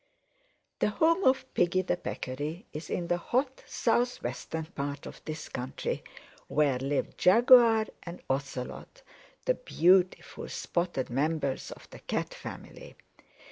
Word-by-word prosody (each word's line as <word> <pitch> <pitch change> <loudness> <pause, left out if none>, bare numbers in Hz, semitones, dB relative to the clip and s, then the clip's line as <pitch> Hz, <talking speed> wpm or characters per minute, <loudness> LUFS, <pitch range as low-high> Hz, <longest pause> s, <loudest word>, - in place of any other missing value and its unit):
"The - - +3
home 330 - +3
of 260 0 +4
Piggy 175 +2 +2
the 180 - 0
Peccary 150 - -5
is 155 +2 -6
in 175 - -1
the 175 +1 +1
hot 260 +7 -1
southwestern 235 -9 -1
part 145 -4 -5
of - - -10
this 155 0 -5
country, 125 +1 -4 0.4
where 140 -4 +2
live 135 +2 -2
Jaguar 230 +2 +7 0.2
and 170 0 -8
Ocelot, 135 - -4 0.4
the - - +4
beautiful 185 - +2
spotted 170 -8 -2
members 140 +1 -1
of - - -11
the - - -10
Cat - - -3
family. - - -9
175 Hz, 125 wpm, -29 LUFS, 145-230 Hz, 0.4 s, Jaguar